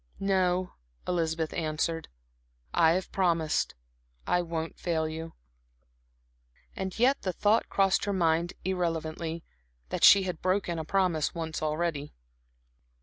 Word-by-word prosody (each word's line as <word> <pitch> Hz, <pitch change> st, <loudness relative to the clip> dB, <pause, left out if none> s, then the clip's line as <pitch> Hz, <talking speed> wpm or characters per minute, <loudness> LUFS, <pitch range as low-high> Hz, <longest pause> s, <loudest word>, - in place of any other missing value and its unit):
"No," 185 Hz, -2 st, +1 dB, 0.3 s
Elizabeth 165 Hz, -2 st, -1 dB
answered, 165 Hz, 0 st, -2 dB, 0.7 s
"I 160 Hz, 0 st, +5 dB
have 185 Hz, +1 st, -2 dB
promised 170 Hz, -5 st, +1 dB, 0.5 s
I 180 Hz, -, +2 dB
won't 165 Hz, -1 st, -4 dB
fail 160 Hz, -2 st, 0 dB
you." 160 Hz, +1 st, -6 dB, 1.4 s
And 190 Hz, -1 st, -4 dB
yet 260 Hz, +4 st, +3 dB
the 185 Hz, -, -1 dB
thought 210 Hz, +5 st, +2 dB
crossed 195 Hz, -1 st, +2 dB
her 205 Hz, -, 0 dB
mind 170 Hz, -2 st, +1 dB
irrelevantly, 165 Hz, -2 st, -2 dB, 0.5 s
that -, -, -3 dB
she 200 Hz, -1 st, +9 dB
had 180 Hz, -3 st, -4 dB
broken 185 Hz, -2 st, 0 dB
a 160 Hz, -, -4 dB
promise 175 Hz, -4 st, +1 dB
once 160 Hz, -1 st, -4 dB
already. 155 Hz, -1 st, -2 dB
170 Hz, 120 wpm, -29 LUFS, 160-185 Hz, 1.4 s, she